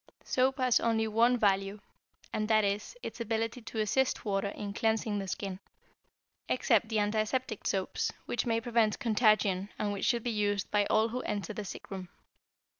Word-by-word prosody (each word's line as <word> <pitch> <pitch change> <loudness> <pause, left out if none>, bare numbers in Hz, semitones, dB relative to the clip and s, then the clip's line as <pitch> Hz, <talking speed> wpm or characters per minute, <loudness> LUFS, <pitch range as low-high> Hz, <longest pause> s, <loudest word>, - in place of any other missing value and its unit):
Soap 260 +1 +1
has 255 -2 +3
only 225 -1 +1
one 235 +3 +3
value, 195 -1 +1 0.5
and 215 0 -1
that 215 -1 +4
is, 200 - -2
its - - -6
ability 225 +2 -2
to 225 - -8
assist 255 +5 +1
water 200 -1 0
in 200 0 -5
cleansing 220 -1 0
the 195 - -4
skin, 190 0 -4 0.9
except 225 -3 +2
the 220 - 0
antiseptic 215 +3 0
soaps, 190 -1 -1
which 240 - -2
may 230 -1 +2
prevent 230 -3 +1
contagion 215 -4 +2
and 205 -1 -1
which 200 - -2
should 235 -3 +2
be 240 - -1
used 205 -2 0
by 205 -1 +2
all 220 +1 +3
who 250 +2 -3
enter 210 -3 -3
the 210 - -5
sick - - -9
room. 185 -2 -6
215 Hz, 175 wpm, -31 LUFS, 205-230 Hz, 0.9 s, that